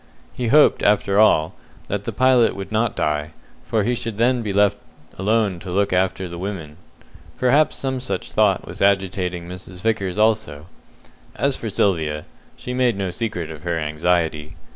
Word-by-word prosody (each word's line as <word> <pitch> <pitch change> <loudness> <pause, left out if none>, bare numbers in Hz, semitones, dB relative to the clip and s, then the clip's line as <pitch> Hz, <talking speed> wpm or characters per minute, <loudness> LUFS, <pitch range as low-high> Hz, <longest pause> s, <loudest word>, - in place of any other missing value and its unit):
He 125 - -3
hoped, 150 +6 +5
after 100 -1 +2
all, 80 -7 +4 0.3
that 105 0 -3
the - - -2
pilot 130 -2 +3
would 95 0 -7
not 115 +1 0
die, 75 -2 -1 0.3
for 110 -2 +1
he 120 +4 +1
should 115 -3 -4
then 120 +2 +2
be 105 -3 -3
left 100 0 +2 0.4
alone 105 -2 +1
to 90 - -9
look 100 +2 +1
after 95 0 0
the 85 0 -8
women. 85 -6 -6 0.6
Perhaps 140 +5 +3
some 130 -1 -3
such 130 - -4
thought - - +2
was - - -9
agitating 95 -3 0
Mrs. 90 0 -9
Vickers 100 -4 -1
also. 110 -9 +1 0.7
As 140 -1 +1
for 115 - -5
Sylvia, 80 -7 0 0.3
she 125 - -6
made 125 -4 +1
no 95 -2 -2
secret 90 -6 -4
of 75 -2 -9
her 85 0 -2
anxiety. 75 0 -1
100 Hz, 165 wpm, -21 LUFS, 85-115 Hz, 0.7 s, hoped